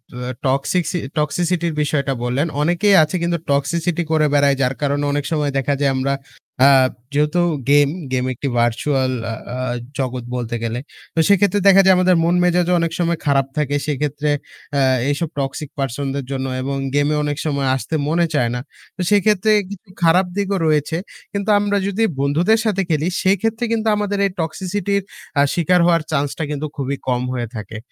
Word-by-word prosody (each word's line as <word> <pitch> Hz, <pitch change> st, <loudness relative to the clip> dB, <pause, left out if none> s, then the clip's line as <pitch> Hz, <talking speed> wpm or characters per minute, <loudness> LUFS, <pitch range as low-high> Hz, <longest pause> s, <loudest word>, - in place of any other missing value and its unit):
অ্যা 125 Hz, +1 st, -4 dB, 0.2 s
টক্সিসি 145 Hz, +6 st, 0 dB, 0.2 s
টক্সিসিটির 170 Hz, +3 st, 0 dB
বিষয়টা 140 Hz, -2 st, 0 dB
বললেন। 130 Hz, +6 st, 0 dB
অনেকেই 175 Hz, +6 st, +3 dB
আছে 155 Hz, +4 st, -3 dB
কিন্তু 170 Hz, 0 st, 0 dB
টক্সিসিটি 160 Hz, +4 st, 0 dB
করে 155 Hz, -1 st, +3 dB
বেড়ায়। 140 Hz, -1 st, +4 dB
যার 125 Hz, 0 st, +1 dB
কারণে 145 Hz, 0 st, 0 dB
অনেক 145 Hz, 0 st, -1 dB
সময় 150 Hz, -3 st, 0 dB
দেখা 135 Hz, +1 st, 0 dB
যায় 140 Hz, -1 st, +2 dB
আমরা 135 Hz, +1 st, 0 dB, 0.5 s
আ -, -, +8 dB, 0.4 s
যেহেতু 150 Hz, +4 st, +2 dB, 0.3 s
গেম, 145 Hz, -1 st, +5 dB, 0.2 s
গেম 130 Hz, 0 st, 0 dB
একটি 140 Hz, +3 st, -4 dB
virtual 130 Hz, +3 st, +1 dB, 0.2 s
আ -, -, -3 dB, 0.2 s
আ -, -, -4 dB, 0.4 s
জগৎ 130 Hz, -2 st, -2 dB
বলতে 120 Hz, -1 st, -3 dB
গেলে। 115 Hz, +1 st, -2 dB, 0.4 s
তো 165 Hz, -, +1 dB
সেক্ষেত্রে 200 Hz, 0 st, +3 dB
দেখা 195 Hz, 0 st, +8 dB
যায় 190 Hz, -, +6 dB
আমাদের 185 Hz, 0 st, +4 dB
মন 170 Hz, +2 st, +2 dB
মেজাজও 180 Hz, 0 st, +2 dB
অনেক 165 Hz, -1 st, 0 dB
সময় 170 Hz, -1 st, 0 dB
খারাপ 135 Hz, -2 st, +2 dB
থাকে। 145 Hz, -1 st, 0 dB
সেই 150 Hz, -3 st, -1 dB
ক্ষেত্রে 150 Hz, 0 st, -1 dB, 0.4 s
অ্যা 140 Hz, -1 st, +2 dB, 0.3 s
এইসব 145 Hz, +3 st, -1 dB
টক্সিক 135 Hz, +1 st, -3 dB
পারসন 135 Hz, +1 st, -2 dB
দের 140 Hz, -2 st, -3 dB
জন্য 135 Hz, -1 st, -2 dB, 0.2 s
এবং 135 Hz, +1 st, -2 dB, 0.2 s
গেমে 145 Hz, +1 st, +2 dB
অনেক 145 Hz, -1 st, -2 dB
সময় 140 Hz, -3 st, 0 dB
আসতে 145 Hz, +4 st, -3 dB
মনে 170 Hz, +2 st, +2 dB
চায় 125 Hz, -5 st, +2 dB
না। -, -, -2 dB, 0.4 s
তো -, -, -5 dB
সেইক্ষেত্রে 210 Hz, 0 st, +3 dB, 0.5 s
খারাপ 175 Hz, +3 st, +5 dB
দিকও 200 Hz, -1 st, 0 dB
রয়েছে। 155 Hz, +1 st, +1 dB, 0.4 s
কিন্তু 200 Hz, +1 st, -2 dB
আমরা 205 Hz, 0 st, 0 dB
যদি 200 Hz, +3 st, 0 dB, 0.2 s
বন্ধুদের 170 Hz, +11 st, +2 dB
সাথে 200 Hz, -3 st, +1 dB
খেলি, 155 Hz, +1 st, +1 dB, 0.2 s
সেইক্ষেত্রে 225 Hz, +5 st, +1 dB
কিন্তু 225 Hz, -1 st, 0 dB
আমাদের 205 Hz, -1 st, -1 dB
এই 195 Hz, -, 0 dB
টক্সিসিটির 190 Hz, +4 st, -2 dB, 0.4 s
আ -, -, +6 dB
শিকার 180 Hz, +1 st, +2 dB
হওয়ার 170 Hz, -2 st, +3 dB
চান্স 145 Hz, -1 st, +1 dB
টা 160 Hz, -, -2 dB
কিন্তু 150 Hz, +1 st, -3 dB
খুবই 140 Hz, 0 st, -2 dB
কম 125 Hz, -1 st, +1 dB
হয়ে 120 Hz, -2 st, -3 dB
থাকে। 110 Hz, +1 st, -7 dB
150 Hz, 175 wpm, -19 LUFS, 140-180 Hz, 0.5 s, আ